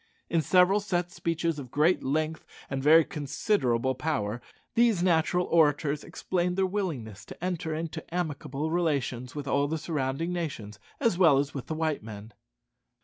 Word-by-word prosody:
In 165 -1 +3
several 185 +4 +4
set 180 -4 -2
speeches 165 -4 -1
of 130 -3 -8
great 155 +8 +2
length 155 +3 -1 0.3
and 135 -1 -1
very 155 +3 +6
considerable 130 - 0
power, 120 -6 -2 0.3
these 230 -6 +3
natural 180 0 +2
orators 150 -2 +2
explained 180 0 -2
their 190 - +3
willingness 155 - -3
to - - -11
enter 175 -3 -2
into 160 0 -4
amicable 155 -3 -3
relations 135 - -1
with 145 -1 -5
all 140 +1 +2
the 160 +2 -2
surrounding 155 +1 -2
nations, 115 -12 -5 0.2
as 230 -9 +1
well 160 -7 +6
as 140 +1 0
with 135 - -6
the 160 - -3
white 155 -2 -1
men. 105 0 -10
155 Hz, 155 wpm, -28 LUFS, 135-175 Hz, 0.3 s, very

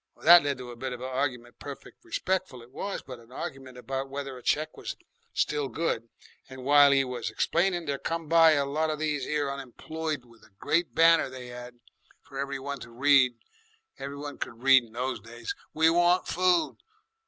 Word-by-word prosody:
Well, - - -16
that 175 +1 +10
led 140 -2 -1
to 125 -1 -8
a - - -9
bit 130 +2 -4
of 125 - -8
a 130 - -4
argument, 130 -2 -3
perfect 145 - -10
respectful 185 - -2
it 120 - -18
was, 200 +8 -5
but 130 -2 -9
a 115 +1 -19
argument 130 -1 -7
about 135 +2 -4
whether 135 -1 -5
a 125 - -11
cheque 155 +5 0
was - - -6 0.4
still 145 -2 0
good, 120 -4 -2 0.4
and 130 -1 -9
while 145 0 +7
'e 135 -1 +4
was 125 -5 -4
explaining 175 +9 0
there 140 -2 -2
come 165 -1 -3
by 165 0 +6
a 140 -2 +1
lot 155 +3 -1
of 155 - -2
these 150 -3 -1
here 145 -2 -1
unemployed 140 +2 -5
with 115 -2 -20
a 110 - -20
great 170 - 0
banner 165 -2 +5
they 125 -1 -9
'ad 120 0 -10 0.4
for 135 -1 -9
every 140 0 -2
one 140 0 -5
to 115 - -10
read 130 +1 +4 0.7
every 140 +1 -6
one 145 0 -7
could 120 0 -6
read 130 -4 +5
those 125 +3 -3
days 120 0 -7 0.2
'We 160 +1 +5
want 175 +1 +3
Food.' 180 -1 +2
140 Hz, 200 wpm, -28 LUFS, 125-155 Hz, 0.7 s, that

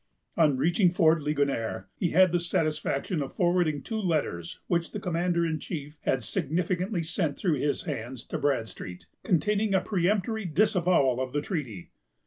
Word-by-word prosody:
On 150 -5 +4
reaching 175 +7 +3
Fort 165 -2 +3
Ligonier, 140 -6 -1
he 175 - 0
had 185 +2 +5
the 175 - +2
satisfaction 155 -1 -1
of 135 - -5
forwarding 175 -5 +1
two 220 - -3
letters, 150 - -2
which 170 -1 -1
the 210 - -3
commander 175 -2 0
in 160 -1 -1
chief 150 -2 -6
had 130 -3 +1
significantly 180 - -1
sent 160 -2 -2
through 165 -8 0
his 145 +1 0
hands, 120 +2 -5
to - - -2
Bradstreet, 115 -9 -2 0.2
containing 200 +4 +1
a - - +5
peremptory 205 +3 0
disavowal 175 - +2
of 130 -1 -4
the 145 - 0
treaty. 125 - -5
165 Hz, 155 wpm, -28 LUFS, 140-180 Hz, 0.2 s, had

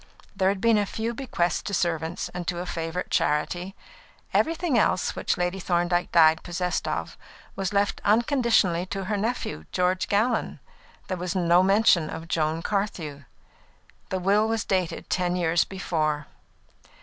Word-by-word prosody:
There 190 0 +2
had 195 -1 -2
been 230 -2 +4
a 205 - +1
few 225 +4 -3
bequests 215 -9 -1
to 200 - -3
servants 165 -1 -1
and 180 -1 -6
to 175 - -1
a 175 - -4
favourite 165 +1 -4
charity. 175 +6 0 0.6
Everything 330 -3 +1
else 210 -4 +2
which - - -1
Lady 180 +2 -1
Thorndyke 175 0 0
died 160 -1 +5
possessed 180 0 -2
of - - -4 0.4
was 195 -2 -2
left 200 0 0
unconditionally 220 - +2
to 195 +1 -4
her 210 +3 -2
nephew, 205 - -3
George 180 +1 +1
Gallon. 220 +4 0 0.5
There 185 - -3
was 180 +1 -3
no 175 -1 +4
mention 190 -4 +4
of 165 +1 -7
Joan 160 0 -1
Carthew. 165 - -3 0.8
The 190 - -1
will 200 +4 +2
was 225 -1 -1
dated 185 -3 -1
ten 180 -1 0
years 170 -1 +2
before. 155 -6 -2
180 Hz, 150 wpm, -25 LUFS, 170-205 Hz, 0.8 s, died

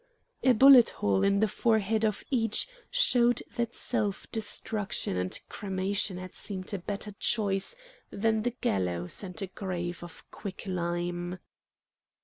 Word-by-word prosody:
A 260 - +5
bullet 260 0 +8
hole 100 -1 0
in 200 +1 +3
the 220 - +4
forehead 220 0 +1
of 215 -2 0
each 225 -5 +2 0.2
showed 245 - +3
that 235 -1 -2
self 215 -5 -2
destruction 210 - -2
and 90 0 -2
cremation 195 -1 -2
had 185 0 -8
seemed 190 -2 -5
a 200 - -2
better 205 +3 -4
choice 200 - +1 0.3
than 220 +1 +1
the 245 - +1
gallows 90 -2 -1
and 180 -5 -7
a - - -3
grave 175 -2 -4
of 175 - -11
quick 195 -3 -7
lime. 175 -1 -2
200 Hz, 135 wpm, -29 LUFS, 180-220 Hz, 0.3 s, bullet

